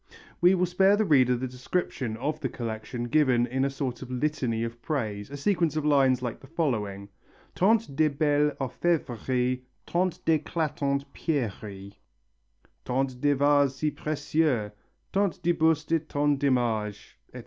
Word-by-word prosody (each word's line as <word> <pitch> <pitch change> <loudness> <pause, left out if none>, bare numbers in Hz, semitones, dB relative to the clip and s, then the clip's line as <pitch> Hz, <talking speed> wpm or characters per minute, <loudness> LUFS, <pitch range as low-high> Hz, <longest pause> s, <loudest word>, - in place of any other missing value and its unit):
We 180 +2 +6
will 180 0 +2
spare 190 +3 +4
the 215 +1 +1
reader 130 -7 +4
the 130 +2 -3
description 125 -2 -3
of 145 +5 -2
the 130 - -2
collection 115 +1 -5
given 125 -2 +3
in 130 +2 -1
a 140 - +2
sort 135 -3 -4
of 130 - -8
litany 125 -4 -1
of 115 0 -6
praise, 110 -9 -3
a 145 - -7
sequence 170 0 +1
of 155 -1 -1
lines 135 -4 +3
like 120 -2 -4
the 135 - -15
following: 105 - -2 0.4
Tant 210 -6 +2
de 155 +1 +4
belles 145 0 +2
orfevreries 130 -3 -1 0.2
Tant 180 0 0
d'éclatantes 150 -3 0
pierreries 105 - -3 0.9
Tant 130 0 -2
de 145 0 +4
vases 145 -1 +3
si 150 +2 -1
précieux, 145 -8 0 0.4
Tant 200 -2 +1
de 175 - +3
bustes 160 -1 +1
et 160 -1 0
tant 145 -1 +1
d'images, 115 -7 -1 0.2
etc. - - -6
140 Hz, 150 wpm, -27 LUFS, 125-155 Hz, 0.9 s, We